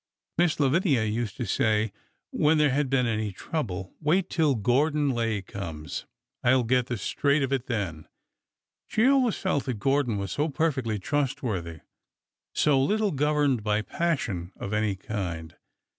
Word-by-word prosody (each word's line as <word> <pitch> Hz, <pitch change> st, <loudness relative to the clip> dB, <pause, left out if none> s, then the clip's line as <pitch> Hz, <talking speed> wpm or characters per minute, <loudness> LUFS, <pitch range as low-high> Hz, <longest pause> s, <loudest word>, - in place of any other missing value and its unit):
Miss 175 Hz, -3 st, +3 dB
Lavinia 145 Hz, -, +3 dB
used 110 Hz, +2 st, -2 dB
to 125 Hz, -, -2 dB
say 110 Hz, +1 st, +1 dB, 0.4 s
when 155 Hz, +1 st, +3 dB
there 150 Hz, -2 st, +4 dB
had 140 Hz, 0 st, +1 dB
been 130 Hz, -2 st, +2 dB
any 110 Hz, -2 st, -1 dB
trouble: 95 Hz, -, -4 dB
'Wait 175 Hz, +5 st, +1 dB
till 155 Hz, -5 st, +2 dB
Gordon 140 Hz, +6 st, +2 dB
Lay 115 Hz, -5 st, -1 dB
comes. 80 Hz, -7 st, -6 dB, 0.4 s
I 125 Hz, +2 st, +5 dB
will 130 Hz, -, +3 dB
get 125 Hz, +1 st, +2 dB
the 120 Hz, -, -2 dB
straight 140 Hz, +8 st, +1 dB
of 135 Hz, 0 st, -1 dB
it 130 Hz, -2 st, -1 dB
then.' 90 Hz, -10 st, -3 dB, 0.8 s
She 220 Hz, -, +2 dB
always 260 Hz, -4 st, +4 dB
felt 185 Hz, -8 st, 0 dB
that 130 Hz, -3 st, -2 dB
Gordon 135 Hz, -1 st, +1 dB
was 100 Hz, -2 st, -3 dB
so 150 Hz, +2 st, 0 dB
perfectly 135 Hz, -8 st, 0 dB
trustworthy— 110 Hz, -, -2 dB, 0.7 s
so 140 Hz, -3 st, +3 dB
little 210 Hz, +8 st, +1 dB
governed 145 Hz, -3 st, +2 dB
by 105 Hz, 0 st, +1 dB
pas 170 Hz, +4 st, 0 dB
sion 90 Hz, -3 st, -4 dB
of 100 Hz, -, -5 dB
any 105 Hz, -2 st, +1 dB
kind. 90 Hz, -5 st, -5 dB
125 Hz, 160 wpm, -27 LUFS, 105-150 Hz, 0.8 s, I